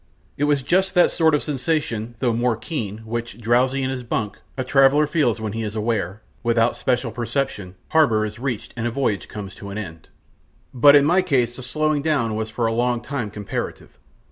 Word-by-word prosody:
It 145 - 0
was 145 -2 +1
just 190 +5 +1
that 175 - +5
sort 160 -2 +3
of 150 - -1
sensation 130 -6 -2
though 120 -1 +1
more 120 0 +1
keen 110 - -5
which, 120 0 -5
drowsy 125 +4 +2
in 130 - -1
his 130 -1 -4
bunk, 110 -3 -3 0.2
a 130 - -1
traveller 135 +3 +4
feels 145 -7 +1
when 110 -2 -4
he 115 - -3
is 105 -1 -4
aware, 110 -2 -2 0.2
without 115 0 +2
special 125 -2 0
perception, 120 -5 -3
harbour 115 -10 +3
is 105 +1 -7
reached 125 -4 -4
and 120 -1 -2
a - - 0
voyage 115 -5 -1
comes 100 -3 -7
to 100 - -9
an 100 - -6
end. 80 -6 -8 0.6
But 140 +3 +7
in 140 -1 +6
my 175 +5 +4
case 125 -8 +1
the 130 - -8
slowing 155 +3 0
down 140 -8 0
was 110 0 -3
for 115 +2 -2
a 115 - +1
long 120 0 +1
time 120 -2 -4
comparative. 105 -1 -6
120 Hz, 200 wpm, -22 LUFS, 110-140 Hz, 0.6 s, But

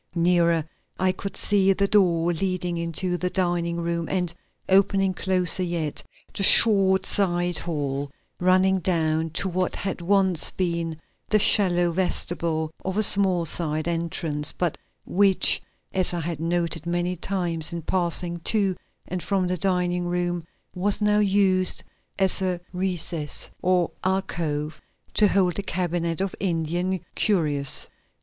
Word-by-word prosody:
Nearer 170 -2 +2 0.3
I 185 0 +2
could 195 +2 -7
see 195 -2 +3
the 200 +1 0
door 175 -4 +2
leading 180 0 -2
into 170 +2 -1
the 180 +1 -2
dining 175 -2 -1
room 170 -1 -3
and, 180 -3 -2 0.3
opening 195 0 +2
closer 185 -1 +2
yet, 170 -4 -3 0.3
the - - -4
short 195 -2 +8
side 175 -3 +1
hall 145 -4 -4 0.3
running 185 +1 +3
down 160 -3 -1
to 165 +5 -2
what 185 0 -2
had 195 -1 -4
once 190 -2 +2
been 170 -3 -3 0.3
the 215 - +3
shallow 175 -4 +3
vestibule 165 -3 -2
of 190 +1 -4
a 215 - +3
small 190 -4 +4
side 155 -1 -2
entrance, 165 -3 -3
but 175 -4 -2 0.3
which, 195 0 +3 0.3
as 185 -2 +3
I 170 - -3
had 165 -1 -5
noted 170 -1 -2
many 175 +1 -1
times 175 -3 -3
in 170 -1 -6
passing 175 0 -2
to 195 +1 +1 0.3
and 185 0 -4
from 190 +2 -1
the 180 - -1
dining 180 -1 0
room, 175 -1 -2 0.3
was 195 +3 -1
now 210 0 +2
used 195 -2 +2 0.3
as 190 -1 +3
a 185 -2 -1
recess 175 -5 -3
or 180 -2 +1
alcove 165 -5 -3 0.3
to 210 - +4
hold 185 -2 +1
a - - 0
cabinet 175 -2 -3
of 195 -1 -2
Indian 175 0 -2
curios. 150 -9 0
175 Hz, 140 wpm, -24 LUFS, 170-190 Hz, 0.3 s, short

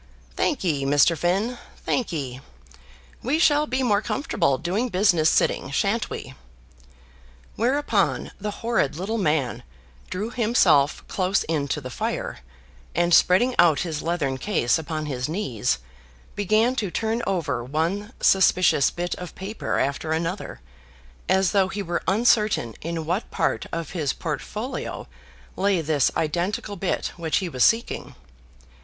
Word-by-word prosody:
"Thankye, 175 - 0
Mr. 145 +4 +4
Finn, 195 - 0 0.3
thankye. 140 - -2 0.8
We 275 +6 +1
shall 300 -2 +4
be 260 0 -1
more 210 -4 +2
comfortable 170 - 0
doing 200 - -1
business 180 -5 +3
sitting, - - +1
shan't 200 - 0
we?" 130 - -7 1.2
Whereupon 270 +6 +1
the 210 - -2 0.2
horrid 230 - +1
little 205 +7 -2
man 150 - 0 0.5
drew 210 +5 -3
himself 195 - +3
close 190 +1 0
in 150 -3 -1
to 150 - -1
the 130 -1 -7
fire, - - -3 0.6
and 175 0 +2
spreading 190 +10 +5
out 170 -4 +5
his 160 -4 -3
leathern 150 -6 -1
case 130 - +1
upon 155 -1 -4
his 130 -2 -3
knees, 125 - -1 0.6
began 215 +5 +2
to 205 - -1
turn 225 +5 -1
over 150 -11 -1
one 165 - -2
suspicious 185 -6 +4
bit 175 +1 -3
of 180 -1 -8
paper 200 +4 -3
after 140 +4 -1
another, 165 +4 -3 0.7
as 190 -2 +3
though 195 -2 +3
he 200 +2 -4
were 175 -1 -2
uncertain 210 - +2
in 165 0 -4
what 180 +7 -2
part 165 - -1
of 165 -2 -4
his 160 -6 -1
portfolio 210 - -5 0.5
lay 195 -2 +2
this 150 -3 +2
identical 175 +6 -1
bit 190 0 -2
which 165 -2 0
he 190 - -1
was 130 -7 0
seeking. 225 +1 +1
175 Hz, 135 wpm, -24 LUFS, 155-210 Hz, 1.2 s, spreading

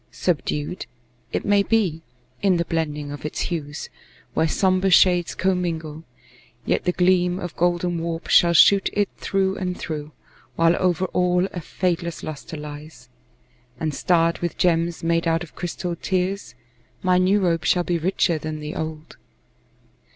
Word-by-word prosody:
Subdued, 165 0 -2 0.4
It - - -2
may 205 0 +4
be, 200 -7 +1 0.4
in 190 -3 +3
the 170 - 0
blending 150 -3 -2
of 145 -2 -8
its 150 - -4
hues, 150 -4 -4 0.4
Where 160 - +2
somber 185 +3 +2
shades 180 -2 +4
commingle, 165 -4 -2 0.6
yet - - 0
the 180 - +3
gleam 180 0 +2
Of 175 -3 -6
golden 175 0 0
warp 165 0 -4
shall 170 0 +5
shoot 195 +3 +6
it 205 -1 +1
through 195 0 0
and 180 -1 -3
through, 155 -2 -5 0.4
While 165 +1 +4
over 180 0 +1
all 180 0 +2
a 175 - -4
fadeless 170 0 -2
luster 155 +1 -7
lies, 150 -3 -10 0.7
And 155 -2 -1
starred 170 +1 +2
with 175 -1 -3
gems 170 -1 +1
made 165 0 +1
out 165 0 +1
of 170 - -12
crystalled 175 -1 -4
tears, 185 - -2 0.5
My 180 -1 +3
new 190 +3 +3
robe 170 -4 +1
shall 180 - +2
be 175 -1 -1
richer 170 -1 +1
than 155 0 -5
the 150 0 -5
old. 155 0 -6
170 Hz, 150 wpm, -23 LUFS, 160-180 Hz, 0.7 s, shoot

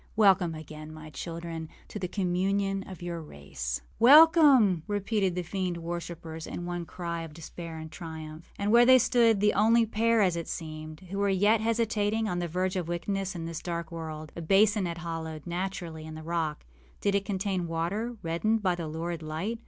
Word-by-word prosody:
Welcome 190 -6 +4
again, 155 0 -9
my 155 0 -10
children, 165 -1 -6 0.2
to 210 - -6
the 185 - -2
communion 195 +1 0
of 185 -2 -9
your 170 -1 -4
race.â 70 - -5 0.2
âWelcome,â 280 - +7
repeated 205 -2 0
the 180 - -2
fiend 180 0 -2
worshippers, 170 -1 -6
in 175 - -5
one 175 -1 -4
cry 170 -2 -4
of 160 -2 -8
despair 165 0 -8
and 160 0 -8
triumph. 160 -1 -8
And 205 +2 0
there 240 +1 +8
they 255 +1 +8
stood, 235 -3 +4
the 210 +1 +3
only 225 +3 +4
pair, 225 0 +2
as 180 -3 +2
it 170 -1 -4
seemed, 155 0 -6
who 200 - -2
were 200 0 +2
yet 205 +3 +3
hesitating 220 -1 +1
on 180 -3 -1
the 175 - -1
verge 185 +3 -1
of 180 -3 -2
wickedness 190 +3 -2
in 165 -1 -4
this 165 -1 -5
dark 170 -1 -4
world. 155 -2 -6
A 170 - -5
basin 200 +4 +4
was 170 -1 -3
hollowed, 165 -2 -5
naturally, 175 -3 -4
in 155 - -8
the 155 - -8
rock. 160 -2 -2 0.3
Did 200 - +1
it 200 0 +2
contain 190 -3 -2
water, 200 +9 -2
reddened 205 +7 0
by 185 -2 +3
the 170 -2 -4
lurid 165 +2 -4
light? 165 +9 -3
175 Hz, 190 wpm, -28 LUFS, 165-205 Hz, 0.3 s, there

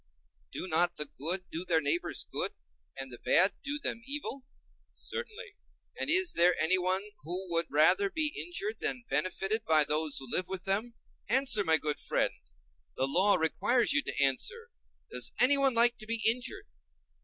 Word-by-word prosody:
Do - - -5
not 175 +1 +2
the 150 - -1
good 170 +6 -3
do 165 - -4
their 170 -3 +1
neighbors 155 +3 -1
good, - - 0 0.4
and 135 -1 -7
the 120 - -10
bad 190 +3 +4
do 285 +1 -3
them 230 -5 -4
evil? 275 -2 -5 0.5
Certainly.And 455 -8 -8
is 365 +2 +4
there 175 +1 +4
anyone 185 +3 +1 0.2
who 180 +3 -5
would 165 -1 +1
rather 160 - +4
be 310 -4 +2
injured 390 +5 -4
than 250 - -2
benefited 195 +4 -1
by 155 -7 +4
those 150 0 0
who 135 - -4
live 180 +8 -2
with 190 0 -7
him? 220 +5 -2 0.3
Answer, 255 -3 +4
my 160 -3 +3
good 150 -1 -3
friend; - - -1 0.6
the 130 - +1
law 190 +8 +3
requires 220 +7 +1
you 145 - +3
to - - -6
answer—does - - -3
anyone 270 0 +4
like 240 +1 +4
to 215 - -8
be 230 0 -2
injured? 255 - -2
190 Hz, 160 wpm, -29 LUFS, 160-255 Hz, 0.6 s, bad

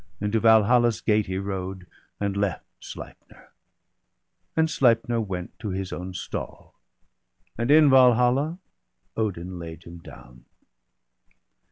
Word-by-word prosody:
And 105 0 -2
to 110 - +3
Valhalla's 115 0 +4
gate 105 +3 +1
he 95 0 -3
rode, 95 -1 -5 0.3
and 100 -1 -2
left 100 -4 -2
Sleipner; - - -12 1.1
and 160 0 +4
Sleipner 120 -6 +2
\vent 90 -3 -5
to 110 - -5
his 95 0 -4
own 90 +1 -6
stall; 90 - -7 0.8
And 120 +2 -2
in 150 +1 +7
Valhalla 130 +4 +4 0.6
Odin 95 -5 -3
laid 80 -1 -9
him 85 0 -11
down. 60 -5 -15
105 Hz, 120 wpm, -25 LUFS, 90-120 Hz, 1.1 s, in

